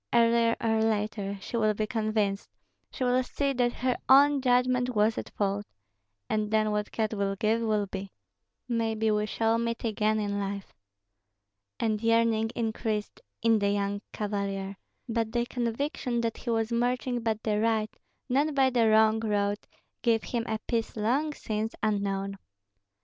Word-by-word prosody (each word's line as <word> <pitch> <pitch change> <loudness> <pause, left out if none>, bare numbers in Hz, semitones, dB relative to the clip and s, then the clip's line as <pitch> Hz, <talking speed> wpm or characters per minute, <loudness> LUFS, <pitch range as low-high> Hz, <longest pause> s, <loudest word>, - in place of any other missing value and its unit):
Earlier 230 0 +4
or 225 -1 +2
later 210 -2 -1
she 235 - -4
will 215 -2 +2
be 215 - 0
convinced, 215 -3 -1 0.4
she - - -4
will 250 0 +3
see 275 +2 -1
that 245 -1 +2
her 250 0 -1
own 280 +1 +6
judgment 250 -1 +2
was 215 +1 +3
at - - -5
fault. 205 0 -2 0.6
And 215 -1 0
then 215 0 +2
what 210 0 -2
God 220 -1 -1
will 200 -1 -1
give 220 +3 +1
will 215 -2 +1
be. 195 0 -6 0.6
Maybe 225 -2 0
we 210 0 +1
shall 225 +1 +1
meet 230 0 -2
again 215 -1 +1
in 205 -1 -1
life." 200 0 -4 1.1
And 215 -2 0
yearning 230 -1 +2
increased 220 -2 -2 0.2
in 225 -1 +4
the 200 0 +1
young 200 0 -1
cavalier; 200 -2 -3 0.3
but 225 -1 -1
the 240 0 +1
conviction 245 +1 -2
that 230 -1 -2
he 240 - -6
was 225 0 0
marching 245 +1 0
by 225 -1 +1
the 210 -1 +1
right, 220 -1 0 0.3
not 285 +3 +1
by 265 -1 +4
the 235 -3 +3
wrong 220 0 +5
road, 205 -2 0 0.4
gave 225 -3 +2
him 235 -2 -2
a 220 - -1
peace 230 -2 -1
long 260 +9 +1
since 220 -4 -3
unknown. 200 -2 -1
220 Hz, 160 wpm, -28 LUFS, 210-235 Hz, 1.1 s, own